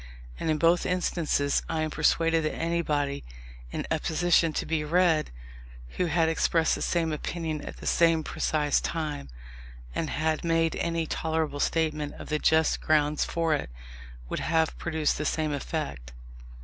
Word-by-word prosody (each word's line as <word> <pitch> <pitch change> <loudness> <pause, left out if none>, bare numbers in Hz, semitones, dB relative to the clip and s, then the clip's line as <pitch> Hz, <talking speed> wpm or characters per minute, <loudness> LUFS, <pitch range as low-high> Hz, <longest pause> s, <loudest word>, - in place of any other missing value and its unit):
And - - -2
in 155 - +2
both 170 +3 +3
instances, 170 -5 +1
I 160 -1 -1
am 155 - -2
persuaded 165 +2 +2
that 155 - -1
anybody, 150 -4 -1 0.5
in - - -4
a - - +2
position 170 0 +2
to - - -2
be 160 -2 -1
read, 165 0 +2 0.6
who 175 - -1
had 165 0 +2
expressed 160 0 +2
the - - -3
same 165 -2 0
opinion 160 0 -3
at - - -8
the - - -10
same 165 -2 +3
precise 150 -1 0
time, 150 - -3 0.6
and 160 - -2
had 155 0 -1
made 165 -1 +1
any 165 -1 -1
tolerable 160 -2 -2
statement 155 -2 0
of - - -10
the 150 0 0
just 160 +1 +3
grounds 150 -1 +2
for 165 -2 0
it, 145 - -2 0.6
would - - -3
have 160 0 +1
produced 160 -4 0
the - - -1
same 155 0 0
effect. 70 - -4
160 Hz, 160 wpm, -27 LUFS, 150-165 Hz, 0.6 s, both